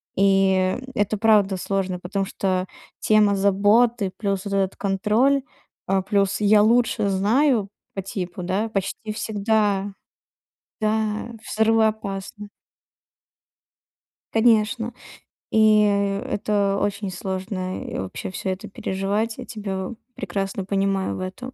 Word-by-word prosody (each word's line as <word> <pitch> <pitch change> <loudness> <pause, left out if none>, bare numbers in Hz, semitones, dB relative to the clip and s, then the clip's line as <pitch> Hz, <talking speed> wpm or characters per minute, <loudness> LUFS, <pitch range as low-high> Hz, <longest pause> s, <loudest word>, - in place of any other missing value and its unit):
И, 195 0 +4 0.3
м, - - -11
это 205 +1 0
правда 205 -3 +3
сложно, 185 -1 -2
потому 195 +2 -2
что 185 -1 -1 0.3
тема 210 -2 +4
заботы 205 +2 +3
плюс 200 -2 -2
вот 200 - -4
этот 195 -1 0
контроль, 215 +8 +2 0.5
а, 195 0 +2
плюс 195 0 +1
"я 210 0 +5
лучше 230 -2 +2
знаю" 215 +3 +2 0.3
по 195 - -3
типу, 185 -2 -5
да, 195 +5 -1
почти 215 +1 -3
всегда, 205 -2 0 0.9
да, 215 +1 -1
взрывоопасно. 215 -2 0 1.9
Конечно. 225 +1 +2 0.6
И, 215 -1 +5
э, 200 -1 +1
это 200 -1 +1
очень 200 0 -2
сложно 185 0 -4
и - - -5
вообще 95 - -5
всё 190 - -4
это 190 +3 -6
переживать. 200 +4 -2
Я 255 - -7
тебя 195 -4 -4
в - - -7 0.2
прекрасно 195 0 -3
понимаю 195 -1 0
в - - -6
этом. 195 +8 -6
200 Hz, 120 wpm, -23 LUFS, 195-220 Hz, 1.9 s, я